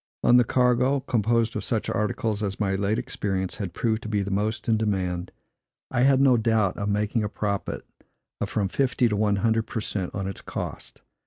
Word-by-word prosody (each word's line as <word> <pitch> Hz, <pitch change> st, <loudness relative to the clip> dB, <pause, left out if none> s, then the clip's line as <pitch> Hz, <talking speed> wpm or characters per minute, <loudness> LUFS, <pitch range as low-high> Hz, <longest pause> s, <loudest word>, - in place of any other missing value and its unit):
On 125 Hz, -, +6 dB
the 125 Hz, -, +6 dB
cargo, 125 Hz, +3 st, +2 dB
composed 115 Hz, -2 st, +1 dB
of -, -, -2 dB
such 110 Hz, -3 st, -1 dB
articles 105 Hz, 0 st, -1 dB
as 100 Hz, -2 st, -3 dB
my 100 Hz, -2 st, +1 dB
late 100 Hz, +2 st, 0 dB
experience 95 Hz, -7 st, -3 dB
had 95 Hz, -5 st, -5 dB
proved 110 Hz, -1 st, 0 dB
to 110 Hz, -, -6 dB
be 105 Hz, -2 st, 0 dB
most 105 Hz, +3 st, -2 dB
in 115 Hz, -, +4 dB
demand, 95 Hz, -5 st, -1 dB, 0.6 s
I 120 Hz, -, +1 dB
had 135 Hz, 0 st, +5 dB
no 135 Hz, -3 st, +5 dB
doubt 110 Hz, -4 st, +2 dB
of 100 Hz, 0 st, -2 dB
making 105 Hz, +2 st, 0 dB
a 105 Hz, -, -2 dB
profit 100 Hz, -1 st, -3 dB, 0.5 s
of -, -, -2 dB
from 100 Hz, -2 st, 0 dB
fifty 125 Hz, +3 st, +1 dB
to 105 Hz, -, 0 dB
one 105 Hz, 0 st, +2 dB
hundred 110 Hz, +2 st, +1 dB
per -, -, -3 dB
cent 95 Hz, -4 st, -4 dB
on 100 Hz, -2 st, -2 dB
its 95 Hz, -, -6 dB
cost. -, -, -6 dB
110 Hz, 195 wpm, -25 LUFS, 100-115 Hz, 0.6 s, On